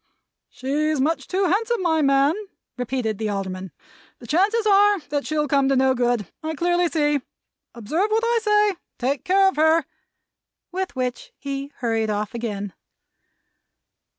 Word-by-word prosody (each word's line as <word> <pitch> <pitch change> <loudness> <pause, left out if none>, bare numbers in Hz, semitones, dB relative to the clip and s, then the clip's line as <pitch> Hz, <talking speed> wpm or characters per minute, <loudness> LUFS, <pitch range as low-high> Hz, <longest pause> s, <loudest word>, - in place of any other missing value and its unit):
"She's 295 +3 -1
much 315 +5 0
too 380 +1 0
handsome, 430 +4 0
my 320 -2 +2
man," 275 +1 +4 0.4
repeated 245 -4 -2
the 215 -1 -1
Alderman. 190 -2 -4 0.5
"The 240 - -13
chances 400 - +2
are, 410 -1 +5
that 285 0 -2
she'll 300 -1 0
come 275 -1 +2
to 275 - +3
no 265 0 +3
good, 240 -4 0 0.2
I 315 0 -3
clearly 350 +2 +2
see. 295 -2 +1 0.5
Observe 310 - -1
what 445 +1 +1
I 470 0 +2
say. 420 -3 +2 0.2
Take 260 +1 -1
care 385 +1 +4
of 380 - -8
her!" 315 0 +4 0.9
With 375 -3 -3
which, 250 -1 -4
he 275 0 -5
hurried 225 -2 0
off 210 0 -2
again. 205 -4 -4
290 Hz, 150 wpm, -23 LUFS, 245-365 Hz, 0.9 s, are